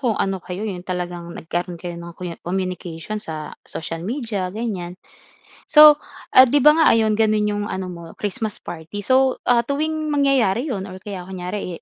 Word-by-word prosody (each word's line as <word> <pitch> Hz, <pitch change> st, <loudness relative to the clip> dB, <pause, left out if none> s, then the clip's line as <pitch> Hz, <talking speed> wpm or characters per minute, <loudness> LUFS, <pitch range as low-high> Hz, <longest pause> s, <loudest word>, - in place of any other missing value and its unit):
kung 240 Hz, -5 st, 0 dB
ano 195 Hz, -1 st, -1 dB
kayo 180 Hz, +4 st, -6 dB
'yong 195 Hz, -5 st, -4 dB
talagang 175 Hz, -1 st, -4 dB
nagkaroon 175 Hz, +2 st, -4 dB
kayo 175 Hz, +1 st, -6 dB
ng 170 Hz, 0 st, -10 dB
kunya 175 Hz, -2 st, -6 dB
communication 180 Hz, +1 st, -4 dB
sa 155 Hz, -5 st, -6 dB, 0.2 s
social 165 Hz, 0 st, -5 dB
media 215 Hz, -, -3 dB
ganyan. 185 Hz, -4 st, -4 dB, 0.7 s
So, 300 Hz, -1 st, +9 dB, 0.3 s
ah, 260 Hz, -, +8 dB
'di 285 Hz, +3 st, +2 dB
ba 300 Hz, +3 st, +7 dB
nga 320 Hz, -, +5 dB
ayon 220 Hz, -2 st, +2 dB
gano'n 215 Hz, -1 st, +2 dB
'yong 205 Hz, 0 st, -2 dB
ano 190 Hz, -3 st, -4 dB
mo 170 Hz, -1 st, -8 dB
Christmas 215 Hz, +1 st, -4 dB
party 170 Hz, +4 st, -7 dB
so, 260 Hz, +4 st, +2 dB
ah, 235 Hz, -1 st, +4 dB
tuwing 310 Hz, +1 st, -1 dB
mangyayari 275 Hz, -3 st, +2 dB
'yon 195 Hz, -6 st, -3 dB
or 185 Hz, -1 st, -10 dB
kaya 190 Hz, -3 st, -7 dB
kunyari, 180 Hz, -1 st, -5 dB
200 Hz, 175 wpm, -21 LUFS, 180-240 Hz, 0.7 s, So